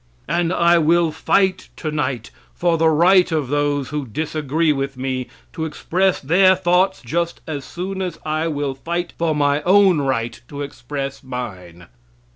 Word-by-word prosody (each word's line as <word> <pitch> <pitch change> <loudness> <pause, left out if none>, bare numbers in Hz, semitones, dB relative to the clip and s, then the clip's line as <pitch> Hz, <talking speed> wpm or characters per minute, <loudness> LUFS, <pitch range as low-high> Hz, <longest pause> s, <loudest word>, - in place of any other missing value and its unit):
And 170 +3 0
I 170 -1 +4
will 165 +1 +3
fight 185 +4 +1
tonight 145 -7 -3 0.2
for 175 -1 +1
the 165 0 +3
right 180 +3 +4
of 150 -5 -1
those 145 -1 0
who 150 -3 -4
disagree 155 +4 0
with 135 -1 -3
me 130 -1 -3 0.3
to 160 - -4
express 185 +4 0
their 185 +6 +4
thoughts 185 0 +1
just 170 +6 -2
as 145 -3 -5
soon 190 +5 -5
as 180 -2 -3
I 155 +1 -1
will 145 -3 -2
fight 170 +6 -4
for 165 -2 +1
my 145 0 +2
own 190 0 +5
right 120 -4 -2
to 145 +1 -6
express 135 0 -6
mine. 95 -10 -7
155 Hz, 155 wpm, -20 LUFS, 135-175 Hz, 0.3 s, own